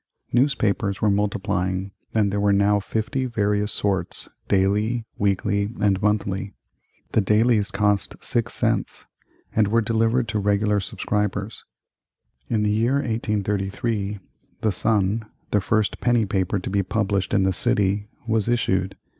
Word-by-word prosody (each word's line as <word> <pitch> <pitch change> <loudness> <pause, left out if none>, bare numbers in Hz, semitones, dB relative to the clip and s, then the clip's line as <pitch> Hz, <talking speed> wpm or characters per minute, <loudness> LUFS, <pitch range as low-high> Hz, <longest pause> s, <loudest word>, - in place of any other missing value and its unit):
Newspapers 115 -6 +1
were 105 - +3
multiplying, 95 -2 -1 0.2
and 100 -3 +2
there 100 - 0
were 100 0 +3
now 100 +1 +3
fifty 110 +6 -2
various 105 -2 0
sorts, 95 -4 -1 0.2
daily, 105 +4 +1
weekly, 100 0 +1
and 100 -2 +2
monthly. 100 -1 -1 0.6
The 110 - +3
dailies 105 +1 +3
cost 105 -1 0
six 120 0 -1
cents, 115 -3 -1 0.5
and 110 -2 +4
were 115 +3 +3
delivered 115 +2 +1
to 110 -1 0
regular 105 +1 +2
subscribers. 105 +1 -3 0.8
In 110 -2 +1
the 105 - +2
year 115 +5 +2
1833 105 -3 -1 0.4
the 110 - +2
Sun, 105 +1 0 0.2
the 105 - +3
first 105 +2 0
penny 120 -2 +3
paper 95 0 0
to 95 - -4
be 100 0 +2
published 100 -1 -1
in 100 - +3
the 95 0 +2
city, 105 -2 +1 0.2
was 110 -1 0
issued. 95 -5 0
105 Hz, 135 wpm, -23 LUFS, 100-110 Hz, 0.8 s, and